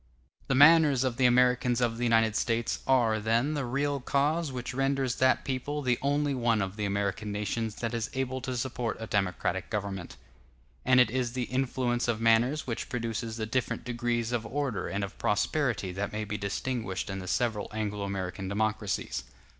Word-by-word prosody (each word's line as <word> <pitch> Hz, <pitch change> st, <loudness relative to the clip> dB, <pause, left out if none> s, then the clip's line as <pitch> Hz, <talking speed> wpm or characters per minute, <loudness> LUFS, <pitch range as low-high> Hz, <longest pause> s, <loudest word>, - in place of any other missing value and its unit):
The 135 Hz, -, +1 dB
manners 145 Hz, -2 st, +7 dB
of 130 Hz, -3 st, -1 dB
the 130 Hz, -2 st, +5 dB
Americans 125 Hz, 0 st, +3 dB
of 120 Hz, -2 st, 0 dB
the -, -, -1 dB
United 115 Hz, -2 st, +3 dB
States 115 Hz, 0 st, 0 dB
are, 120 Hz, -5 st, +3 dB
then, 115 Hz, +7 st, +1 dB
the 145 Hz, -3 st, -2 dB
real 140 Hz, +3 st, -1 dB
cause 145 Hz, +4 st, 0 dB
which 125 Hz, 0 st, -5 dB
renders 135 Hz, -1 st, 0 dB
that 130 Hz, 0 st, +3 dB
people 145 Hz, +3 st, -2 dB
the 125 Hz, -2 st, +1 dB
only 145 Hz, +1 st, +1 dB
one 120 Hz, -3 st, +1 dB
of 95 Hz, -1 st, -2 dB
the 105 Hz, -1 st, -2 dB
American 100 Hz, +1 st, -1 dB
nations 105 Hz, +1 st, -2 dB
that 115 Hz, 0 st, -3 dB
is 115 Hz, 0 st, -2 dB
able 130 Hz, 0 st, -2 dB
to 130 Hz, -1 st, -3 dB
support 120 Hz, -2 st, -2 dB
a 115 Hz, -, -4 dB
democratic 100 Hz, -4 st, -1 dB
government; 100 Hz, -4 st, -4 dB, 0.7 s
and 130 Hz, 0 st, +5 dB
it 120 Hz, -3 st, +5 dB
is 125 Hz, -1 st, -1 dB
the 125 Hz, -1 st, -1 dB
influence 125 Hz, -1 st, -1 dB
of 115 Hz, -2 st, 0 dB
manners 115 Hz, +6 st, +3 dB
which 115 Hz, -2 st, -4 dB
produces 115 Hz, -1 st, -3 dB
the 110 Hz, -, -2 dB
different 125 Hz, +2 st, -2 dB
degrees 120 Hz, -1 st, -1 dB
of 120 Hz, -2 st, -1 dB
order 125 Hz, -5 st, -2 dB
and 100 Hz, +3 st, -2 dB
of 100 Hz, -, -7 dB
prosperity 105 Hz, -1 st, 0 dB
that 100 Hz, +3 st, -3 dB
may 105 Hz, 0 st, -3 dB
be 105 Hz, 0 st, -4 dB
distinguished 100 Hz, 0 st, -3 dB
in 95 Hz, -1 st, -4 dB
the 90 Hz, -, -7 dB
several 110 Hz, -1 st, 0 dB
Anglo 105 Hz, -1 st, -3 dB
American 95 Hz, -1 st, -4 dB
democracies. 105 Hz, 0 st, -1 dB
120 Hz, 185 wpm, -29 LUFS, 105-130 Hz, 0.7 s, manners